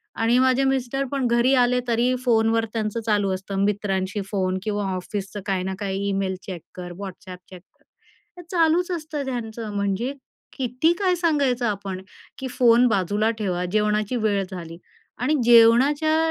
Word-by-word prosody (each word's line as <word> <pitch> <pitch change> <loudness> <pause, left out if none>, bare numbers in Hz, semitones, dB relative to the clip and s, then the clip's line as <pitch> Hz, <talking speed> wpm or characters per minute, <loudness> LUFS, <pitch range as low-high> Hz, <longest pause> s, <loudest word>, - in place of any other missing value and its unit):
आणि 230 +2 +2
माझे 260 +1 +3
मिस्टर 270 0 0
पण 275 -3 0
घरी 240 +3 +3
आले 250 0 +3
तरी 240 +2 +2
फोनवर 225 -1 +3
त्यांचं 220 0 -2
चालू 205 -3 +1
असतं, 195 +1 -3
मित्रांशी 200 -1 -1
फोन 185 -2 0
किंवा 205 -1 -2
ऑफिसचं 195 +2 -5
काही 190 -2 0
ना 190 0 -3
काही 200 -1 -2
ईमेल 195 -1 -1
चेक 180 -4 -7
कर, 180 -1 -7
WhatsApp 185 -1 -8
चेक 185 -2 -11
कर, 185 - -38 0.5
हे 355 - -10
चालूच 345 +1 +2
असतं 310 -4 -4
त्यांचं. 230 -3 -5
म्हणजे 200 +6 -1 0.4
किती 255 +5 +1
काय 370 -2 +2
सांगायचं 285 -8 +1
आपण 195 -2 -4 0.4
की 265 - -4
फोन 245 0 +4
बाजूला 205 +1 +1
ठेवा, 180 -4 -1
जेवणाची 210 +2 +1
वेळ 205 -2 +1
झाली. 170 -3 -7 0.4
आणि 270 +6 +1
जेवणाच्या 260 +7 +5
225 Hz, 155 wpm, -23 LUFS, 195-255 Hz, 0.5 s, जेवणाच्या